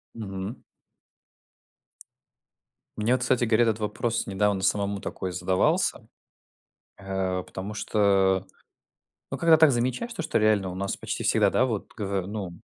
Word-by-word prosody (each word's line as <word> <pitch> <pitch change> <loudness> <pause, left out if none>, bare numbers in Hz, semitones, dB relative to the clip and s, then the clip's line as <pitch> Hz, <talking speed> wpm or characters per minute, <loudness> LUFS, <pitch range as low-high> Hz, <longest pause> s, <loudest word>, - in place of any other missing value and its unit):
Мгм. 100 +1 -5 2.4
Мне 110 +3 0
вот, 125 - +1
кстати 125 -1 +1
говоря, 115 0 +3
этот 110 -1 0
вопрос 110 +2 -1
недавно 100 0 0
самому 100 0 0
такой 95 - -5
задавался. 95 +1 +1 0.9
Э, 95 -1 -2
потому 95 +3 -7
что, 100 -3 +2
э, - - -31 0.8
ну - - -3
когда 165 -1 +5
так 155 -2 +6
замечаешь, 130 - -1
то 195 - -4
что 160 -4 0
реально 105 -3 +2
у 90 - -6
нас 100 +1 -2
почти - - -4
всегда, - - +4
да, 130 - +2
вот 110 -5 -3
гово 100 -3 -2
ну, 100 -3 -5
105 Hz, 140 wpm, -26 LUFS, 95-120 Hz, 2.4 s, так